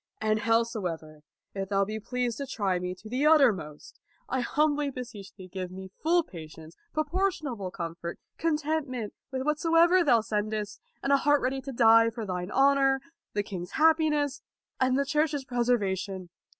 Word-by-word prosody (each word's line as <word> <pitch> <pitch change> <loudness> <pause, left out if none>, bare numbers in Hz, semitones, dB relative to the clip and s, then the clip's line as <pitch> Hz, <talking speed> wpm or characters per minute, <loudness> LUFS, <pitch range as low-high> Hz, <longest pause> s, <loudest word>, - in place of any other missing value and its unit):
And 215 0 +1
howsoever, 205 -9 -1 0.3
if 195 -1 -4
thou 200 -1 +2
be 215 +2 -4
pleased 245 +1 -2
to 280 - -4
try 195 -6 -1
me 180 0 -4
to 215 - -13
the 255 +6 +1
uttermost, 220 - +2 0.3
I 260 - -1
humbly 295 +3 +1
beseech 240 -7 -8
thee 185 -2 -11
give 185 0 -5
me 190 +1 -9
full 340 +2 +3
patience, 160 - -11 0.2
proportionable 310 - -1
comfort, 170 -1 -6 0.2
contentment 300 -7 -1 0.2
with 260 -1 -2
whatsoever 330 +4 +4
thou 240 -7 +4
sendest, 210 -1 -3 0.2
and 275 - +2
an 280 - +5
heart 290 +1 +3
ready 265 +1 -1
to 275 - -6
die 230 -2 +6
for 225 -1 -6
thine 180 -1 -3
honor, 270 +2 +4 0.3
the 205 - 0
king's 180 -4 -7
happiness, 305 -3 +2 0.4
and 260 0 +2
the 280 - +1
Church's 300 -1 0
preservation. 195 -7 -1
235 Hz, 155 wpm, -28 LUFS, 195-285 Hz, 0.4 s, die